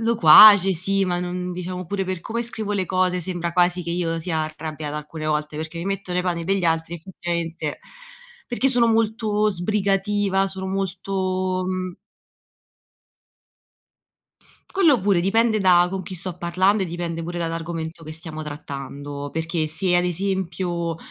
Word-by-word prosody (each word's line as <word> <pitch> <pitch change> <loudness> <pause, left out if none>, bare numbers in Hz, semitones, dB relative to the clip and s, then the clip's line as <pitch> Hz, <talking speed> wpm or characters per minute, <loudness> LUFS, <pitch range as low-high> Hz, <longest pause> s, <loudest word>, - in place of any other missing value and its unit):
loquace, 205 -2 +8
sì, 195 +3 +1
ma 175 -1 -1
non 180 0 -4
diciamo 180 +1 -5
pure 195 +2 -2
per 185 -2 -4
come 230 +6 -3
scrivo 220 -3 -3
le 190 -3 -1
cose 185 0 +1
sembra 175 -1 -3
quasi 180 +1 +2
che 170 - -5
io 170 -1 -1
sia 165 -1 -2
arrabbiata 155 -1 -6
alcune 155 +1 -6
volte, 150 0 -1
perché 160 +2 -5
mi 170 - -4
metto 195 -2 -3
nei 180 0 0
panni 175 -2 -2
degli 195 +1 0
altri 165 0 0
effettivamente, 170 -2 -4 0.7
perché 255 +2 0
sono 245 -3 +4
molto 220 -1 +1
sbrigativa, 195 +1 0
sono 190 0 -5
molto, 185 -1 -2
mhmm 185 -1 -4 2.8
Quello 320 -10 +4
pure 195 -2 +2
dipende 220 +4 +2
da 180 -2 +5
con 190 +1 -4
chi 185 +1 -7
sto 180 0 -4
parlando 185 +4 +1
e - - -1
dipende 170 -1 -4
pure 175 +1 -5
dall’argomento 165 0 -4
che 155 0 -8
stiamo 160 -1 -7
trattando, 145 -1 -7
perché 160 0 -2
se 175 +3 +1
ad 175 - +2
esempio 175 -2 -2
180 Hz, 150 wpm, -22 LUFS, 165-195 Hz, 2.8 s, loquace